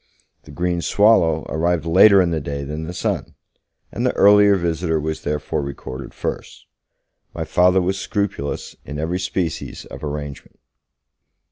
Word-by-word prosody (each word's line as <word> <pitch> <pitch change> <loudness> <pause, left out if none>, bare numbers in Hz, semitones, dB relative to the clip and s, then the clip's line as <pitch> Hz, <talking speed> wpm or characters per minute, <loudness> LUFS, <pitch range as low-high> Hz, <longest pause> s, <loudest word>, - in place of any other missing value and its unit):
The - - -12
green 85 +3 -1
swallow 85 -7 +3
arrived 85 0 0
later 95 +3 +6
in 85 - -1
the 80 -2 -1
day 70 0 -4
than 75 +3 -5
the 85 - -5
son, 90 - -3 0.6
and - - -4
the - - +1
earlier 105 0 +6
visitor 85 -2 -1
was 80 +1 -3
therefore 75 0 -2
recorded 70 -1 -7
first; - - -6 0.7
my - - -3
Father 90 +1 +3
was 95 +2 -1
scrupulous 100 -10 -3
in 75 - -7
every 85 +4 -2
species 90 -3 -3
of - - -11
arrangement. 75 -1 -6
85 Hz, 145 wpm, -21 LUFS, 75-90 Hz, 0.7 s, later